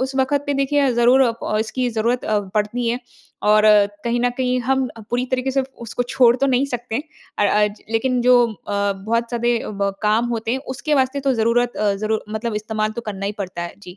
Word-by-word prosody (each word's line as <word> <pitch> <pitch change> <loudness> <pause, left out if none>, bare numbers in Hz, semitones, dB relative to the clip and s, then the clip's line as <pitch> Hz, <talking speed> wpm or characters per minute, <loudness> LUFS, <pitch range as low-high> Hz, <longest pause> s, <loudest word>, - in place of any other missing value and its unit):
उस 265 +1 -2
वक़्त 270 +2 +1
पे 285 - 0
देखिए 275 -1 +2
ज़रूर 240 +3 +5
अ, 240 -3 +2
प 215 - -1
इसकी 250 +3 -1
ज़रूरत 230 +2 0
अ, 215 -1 +1 0.2
पड़ती 220 +3 0
हैं। 240 +2 -1 0.5
और 215 0 +5 0.4
कहीं 235 0 0
न 245 - +3
कहीं 255 -1 0
हम 265 +2 +1
अ, - - -9
पूरी 245 +1 0
तरीके 255 +1 0
से 270 0 +1 0.2
उसको 235 +1 -3
छोड़ 245 -1 +4
तो 275 - +1
नहीं 265 +1 +2
सकते। 245 -3 -4 0.4
अ - - +3
अ, 210 +1 +3
ज 210 +1 -9
लेकिन 250 +2 +1
जो 250 +1 +6 0.2
अ, 200 -1 -2
बहुत 230 +4 -2
ज़्यादें 235 -3 -1
ब 200 0 +1
काम 215 +3 +2
होते 225 -1 -2
हैं 260 - 0 0.2
उसके 295 +3 -1
वास्ते 265 0 +1
तो 275 -1 +1
ज़रूरत 235 +2 +1
अ, 205 -1 +1
ज़रूर 215 +2 -2
मतलब 220 +1 -3
इस्तेमाल 215 0 -2
तो 235 - -5
करना 195 -1 -5
ही 200 - -2
पड़ता 185 -3 -4
है 175 - -6
जी। 180 -2 -11
235 Hz, 225 wpm, -21 LUFS, 215-255 Hz, 0.5 s, जो